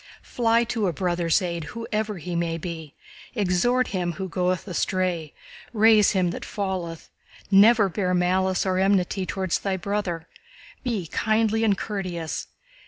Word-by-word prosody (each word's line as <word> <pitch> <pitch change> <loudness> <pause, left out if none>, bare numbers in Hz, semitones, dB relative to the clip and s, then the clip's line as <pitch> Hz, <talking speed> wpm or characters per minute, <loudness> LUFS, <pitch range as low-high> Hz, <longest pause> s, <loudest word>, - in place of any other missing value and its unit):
Fly 230 -1 +2
to 225 -3 -1
a 175 - 0
brother's 175 +2 +1
aid 170 -3 -3
whoever 215 -2 -2
he 175 +1 -5
may 170 -1 -1
be, 160 -3 -7 0.4
exhort 220 +5 +2
him 180 -3 -2
who 190 +2 -5
goeth 180 +1 -1
astray, 180 -4 -1 0.4
raise 215 -1 +5
him 185 -3 +1
that - - -6
falleth, 185 -5 -4 0.4
never 210 +2 +6
bear 185 -1 -1
malice 185 +1 +1
or 185 -1 +1
enmity 190 -1 +1
toward 190 -2 -3
thy 195 +1 0
brother. 185 -4 -3 0.6
Be 225 -8 -2
kindly 220 +5 +1
and 205 -3 +3
courteous. 180 -7 -4
190 Hz, 140 wpm, -25 LUFS, 175-210 Hz, 0.6 s, never